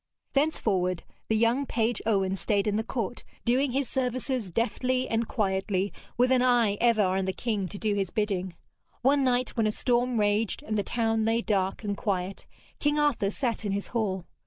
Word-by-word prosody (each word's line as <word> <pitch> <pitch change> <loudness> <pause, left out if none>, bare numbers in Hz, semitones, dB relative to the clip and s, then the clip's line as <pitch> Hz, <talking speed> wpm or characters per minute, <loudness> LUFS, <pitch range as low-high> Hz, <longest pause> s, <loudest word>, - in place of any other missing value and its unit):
Thenceforward 195 - +1 0.2
the 220 - +1
young 235 +5 +2
page 230 +1 0
Owen 195 -3 +2
stayed 200 0 0
in 210 -1 +1
the 220 - 0
court, 235 0 -4 0.2
doing 255 +3 +2
his 270 +1 0
services 255 -3 -2
deftly 255 +5 0
and 225 0 0
quietly, 190 -1 0 0.2
with 250 +2 +3
an 255 -1 +4
eye 240 -5 +3
ever 230 -3 +4
on 190 0 +1
the 190 - 0
king 210 -5 -2
to 200 - -7
do 215 0 0
his 195 -3 -1
bidding. 190 -4 -2 0.5
One 275 +2 +4
night, 250 -1 +2
when 225 -3 +2
a - - +1
storm 245 +1 +1
raged 205 +1 +1
and 215 - -3
the 205 - +2
town 225 +1 0
lay 225 +1 +1
dark 195 0 0
and 205 -1 -1
quiet, 190 -2 -3 0.3
King 295 0 +1
Arthur 290 -9 +2
sat 235 +1 -1
in 205 -2 -1
his 200 0 -3
hall. 195 -6 -1
220 Hz, 185 wpm, -28 LUFS, 200-245 Hz, 0.5 s, an